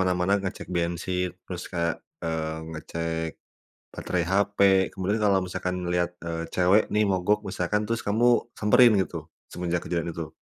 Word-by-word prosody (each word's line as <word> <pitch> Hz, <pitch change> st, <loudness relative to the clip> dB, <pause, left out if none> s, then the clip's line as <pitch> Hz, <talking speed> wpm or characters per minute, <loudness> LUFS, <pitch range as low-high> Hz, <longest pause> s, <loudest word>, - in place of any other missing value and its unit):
mana-mana 90 Hz, +1 st, +1 dB
ngecek 95 Hz, -1 st, -5 dB
bensin, 90 Hz, +1 st, -1 dB, 0.2 s
terus 90 Hz, -1 st, -6 dB
kayak, 85 Hz, -2 st, 0 dB, 0.3 s
eee, 80 Hz, -1 st, -2 dB, 0.2 s
ngecek 80 Hz, +1 st, -3 dB, 0.6 s
baterai 90 Hz, -2 st, -2 dB
HP. 100 Hz, +1 st, +1 dB, 0.4 s
Kemudian 100 Hz, +3 st, -1 dB
kalau 100 Hz, -2 st, +4 dB
misalkan 90 Hz, 0 st, -3 dB
lihat, 90 Hz, 0 st, 0 dB
eee, 85 Hz, 0 st, -4 dB
cewek 95 Hz, +4 st, +4 dB
nih 105 Hz, 0 st, +4 dB
mogok 95 Hz, +3 st, +2 dB
misalkan 95 Hz, +3 st, -1 dB
terus 115 Hz, 0 st, -1 dB
kamu 120 Hz, +4 st, +3 dB
samperin 115 Hz, +3 st, +6 dB
gitu, 95 Hz, -, -3 dB, 0.2 s
semenjak 90 Hz, -1 st, -2 dB
kejadian 85 Hz, 0 st, -1 dB
itu? 80 Hz, -2 st, -5 dB
90 Hz, 145 wpm, -26 LUFS, 85-100 Hz, 0.6 s, samperin